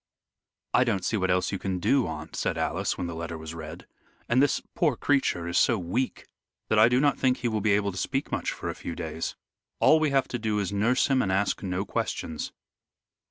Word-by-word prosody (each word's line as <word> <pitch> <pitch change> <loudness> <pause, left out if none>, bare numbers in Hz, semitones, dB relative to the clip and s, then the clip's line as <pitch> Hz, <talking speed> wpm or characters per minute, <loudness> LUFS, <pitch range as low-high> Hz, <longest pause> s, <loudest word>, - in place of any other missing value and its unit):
"I 125 - +5
don't 100 -7 -1
see - - 0
what 95 -3 0
else 90 0 +1
you 100 - -3
can 95 -2 -2
do, 125 +7 +2
aunt," 80 -1 -6
said - - -1
Alice, - - -1
when - - -3
the 85 - -4
letter 85 0 -5
was 80 0 -7
read. 80 +1 -8 0.4
"And 125 +2 +3
this 145 - +3
poor 165 - +2
creature 125 -12 +1
is 85 - +2
so 115 - +4
weak, 100 +9 -2 0.4
that 110 - +3
I 110 +2 +7
do 125 +1 +3
not 145 0 +2
think 130 -1 +2
he 125 - -2
will 110 -2 -1
be 105 0 +3
able 100 0 +1
to 95 - -5
speak 135 +7 -2
much - - -1
for - - -6
a - - -2
few 85 - -6
days. 80 -1 -4 0.4
All 160 - +6
we 155 -1 +2
have 135 -1 +2
to 120 - -3
do 110 -1 -1
is 100 -3 0
to 100 - -4
nurse 115 +6 +3
him 135 -2 +2
and 95 - 0
ask 100 +2 +1
no 95 0 -2
questions." 80 -4 -3
100 Hz, 235 wpm, -27 LUFS, 90-125 Hz, 0.4 s, I